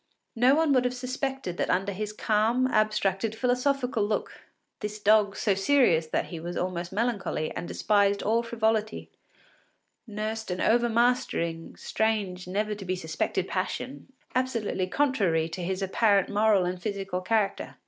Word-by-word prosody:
No 250 +4 +5
one 315 -2 +3
would 255 -2 +4
have 250 0 -1
suspected 255 -6 -4
that - - -1
under 190 +2 +1
his 210 +2 -4
calm, 220 +4 +1
abstracted, 215 -2 +1
philosophical 250 -1 0
look, 210 +1 -2 0.5
this 210 0 -4
dog, 210 -1 +4
so 205 - +1
serious 195 - +3
that - - -1
he 170 - -6
was 175 +2 -5
almost 175 -1 -3
melancholy, 205 -7 -1
and 175 - -5
despised 200 -1 +2
all 225 +2 +2
frivolity, 220 -2 -1 1.0
nursed 215 0 -4
an 180 0 -3
overmastering, 235 -8 +1
strange, 205 -5 -1
never 210 +3 -1
to 210 -1 -7
be 185 0 -2
suspected 175 +2 -2
passion, 260 +8 -4 0.2
absolutely 230 -7 -1
contrary 195 - +1
to 175 +3 -6
his 190 +2 -2
apparent 200 0 +2
moral 205 -3 +3
and 180 0 -3
physical 195 -2 -3
character. 205 +1 -1
210 Hz, 145 wpm, -27 LUFS, 185-235 Hz, 1.0 s, No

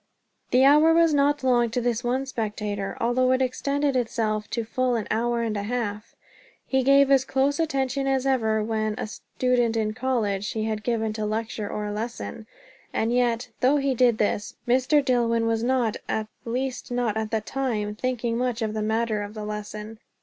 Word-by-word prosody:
The 255 +2 +5
hour 305 +3 +6
was 335 -2 +4
not 290 0 +2
long 240 -2 +3
to 235 - -1
this 240 0 -1
one 255 +3 0
spectator, 210 -5 -3
although 255 +2 +2
it 260 - +2
extended 280 +2 0
itself 220 -3 -1
to 230 - -2
full 250 +2 0
an 225 - -2
hour 235 +2 0
and 220 -2 -2
a 205 - -1
half. 215 -1 -4 0.5
He 265 0 +1
gave 275 +1 +5
as 270 -1 +5
close 270 +2 0
attention 275 -3 0
as 270 -1 +1
ever 220 -5 +1
when 215 -1 -1
a - - -3
student 240 +1 -1
in 215 -1 0
college 215 -5 -1
he 220 - -2
had 215 -1 -2
given 220 -1 -1
to 215 -1 -3
lecture 215 -1 -3
or 210 0 -3
lesson. 225 0 -5 0.4
And 225 +2 0
yet, 245 -1 +1
though 270 +4 +4
he 275 -1 +1
did 245 -2 +3
this, 210 0 -1
Mr. 260 +4 +3
Dillwyn 230 -3 +2
was 225 -1 +1
not, 240 -2 +1
at 220 - -1 0.2
least 250 +2 -3
not 245 -3 0
at 220 -1 -2
the 220 - 0
time, 215 -4 -2
thinking 240 0 -2
much 250 -2 -1
of 215 -1 -2
the 215 - -2
matter 220 0 0
of 205 +1 -7
the 215 -1 -5
lesson. 210 +1 -6
235 Hz, 185 wpm, -25 LUFS, 215-260 Hz, 0.5 s, hour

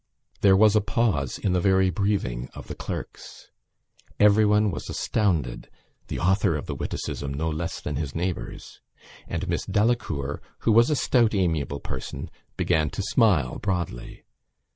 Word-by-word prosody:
There 95 -1 +6
was 110 +1 +5
a 105 - +5
pause 100 - 0
in 95 - 0
the 90 - +2
very 95 0 +3
breathing 80 -11 -1
of - - -9
the - - -5
clerks. - - -8 0.7
Everyone 105 0 +5
was 80 - -6
astounded 85 - -1 0.4
(the - - -4
author 95 -1 +2
of 75 - -4
the - - -4
witticism 70 -1 -4
no 80 +4 -2
less 80 +2 -3
than 75 - -4
his 75 -2 -4
neighbours) 90 +1 -4 0.5
and - - -3
Miss - - -1
Delacour, 95 - 0 0.2
who 115 - +2
was 115 +2 +5
a 150 - +2
stout 120 -4 +2
amiable 80 -7 0
person, 65 - -6 0.3
began 75 -2 +2
to 100 - -4
smile 95 - +2
broadly. 90 - -3
95 Hz, 150 wpm, -25 LUFS, 75-105 Hz, 0.7 s, There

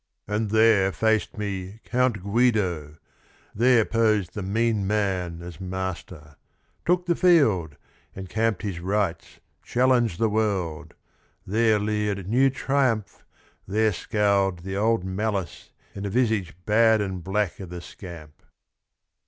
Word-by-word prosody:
And 105 +1 -1
there 110 -3 +4
Faced 110 +3 0
me 100 0 -5
Count 125 -5 0
Guido, 100 -9 0 0.6
there 120 0 +4
posed 110 -5 +1
the 105 - -5
mean 105 +1 0
man 95 -5 -1
As 85 -1 -9
master, 90 -5 -6 0.2
— - - -42
took 180 +1 +2
the 175 -1 +1
field, 110 - +3 0.4
encamped 105 +2 -2
his 95 -5 -3
rights, 95 -1 -2 0.2
Challenged 120 -6 +2
the 115 - +2
world: 95 -7 -2 0.5
there 110 +2 +2
leered 105 -2 -2
new 130 +6 +4
triumph, 130 -5 -1 0.4
there 110 +2 +2
Scowled 100 -3 0
the 95 +1 -5
old 110 -1 +1
malice 95 -2 -3 0.2
in 100 - -7
the 100 - -3
visage 110 -6 0
bad 110 +1 +4
And 95 -4 -3
black 100 +1 -1
o' - - -5
the 90 +1 -7
scamp." 85 -4 -11
105 Hz, 130 wpm, -25 LUFS, 95-110 Hz, 0.6 s, there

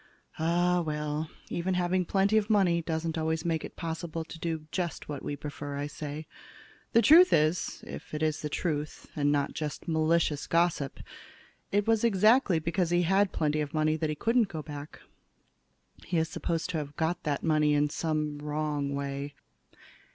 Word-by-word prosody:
"Ah, 175 +2 +2
well, 150 0 -2 0.2
even 180 +2 -1
having 180 +1 +1
plenty 195 +4 +2
of 215 0 +2
money 185 -5 +3
doesn't 160 0 -2
always 160 +1 -1
make 165 -2 0
it - - -8
possible 165 -1 -4
to 165 - -10
do 160 -2 -3
just 175 -3 -3
what 145 -2 -5
we 145 - -3
prefer," 145 -1 -6
I 145 - -2
say. 150 +1 -6 0.7
"The 230 - +5
truth 350 +4 +8
is, 155 +3 +1
if - - -9
it 150 - -2
is 155 -1 0
the 150 - -3
truth, 150 -1 -3
and 145 -1 +2
not 145 -1 0
just 150 +2 -5
malicious 160 -2 +1
gossip, 165 -5 +1 0.7
it 205 0 +2
was 225 -1 +3
exactly 215 -1 +4
because 170 +2 0
he 175 0 +3
had 195 +3 +3
plenty 150 -1 0
of 150 +1 -4
money 155 0 +2
that 155 0 -1
he 155 - -1
couldn't 230 +6 +2
go 155 -4 -6
back. 145 -1 -8 1.0
He 170 +1 -2
is 160 0 +1
supposed 165 +1 -2
to 165 - -1
have 145 -1 -6
got 160 +2 -1
that 145 -2 -2
money 150 -2 +3
in 145 0 +2
some 150 -2 -1
wrong 150 -1 -2
way. 140 0 -4
160 Hz, 175 wpm, -29 LUFS, 150-175 Hz, 1.0 s, truth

